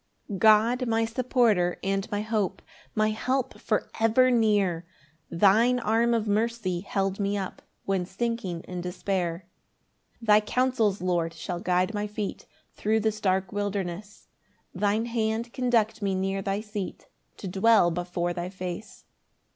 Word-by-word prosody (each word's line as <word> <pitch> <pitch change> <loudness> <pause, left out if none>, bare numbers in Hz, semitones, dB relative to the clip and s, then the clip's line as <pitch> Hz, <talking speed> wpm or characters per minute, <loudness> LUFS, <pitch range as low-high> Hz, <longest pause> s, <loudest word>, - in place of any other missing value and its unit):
1 195 -3 -5
God 225 +4 +4
my 225 0 +2
supporter 225 -6 +2
and 195 0 -1
my 205 -1 -1
hope, 210 -4 -2 0.3
My 215 0 +3
help 255 +4 -2
for 215 - 0
ever 230 +3 +4
near, 205 -7 +2 0.5
Thine 215 +8 +4
arm 235 +1 +2
of 220 -1 -1
mercy 210 -3 0
held 195 +1 -2
me 200 0 0
up 190 -2 -5 0.2
When 190 -2 0
sinking 195 -4 -3
in 180 0 -6
despair. 180 -1 -2 0.8
2 - - -9
Thy 210 -1 +7
counsels, 225 -2 +1
Lord, 170 -2 0
shall 175 +1 -4
guide 180 +3 +1
my 210 0 -2
feet 210 -1 -5 0.3
Thro' 215 +1 0
this 215 -1 -1
dark 190 -1 +1
wilderness; 205 -1 -4 0.5
Thine 210 +2 +1
hand 230 0 -2
conduct 235 -4 +1
me 195 -1 0
near 195 +1 -1
thy 195 +1 -2
seat 210 -3 -6 0.3
To 195 - -6
dwell 195 -1 +4
before 175 0 -2
thy 175 0 -4
face. 185 +2 -7
205 Hz, 145 wpm, -27 LUFS, 185-225 Hz, 0.8 s, Thy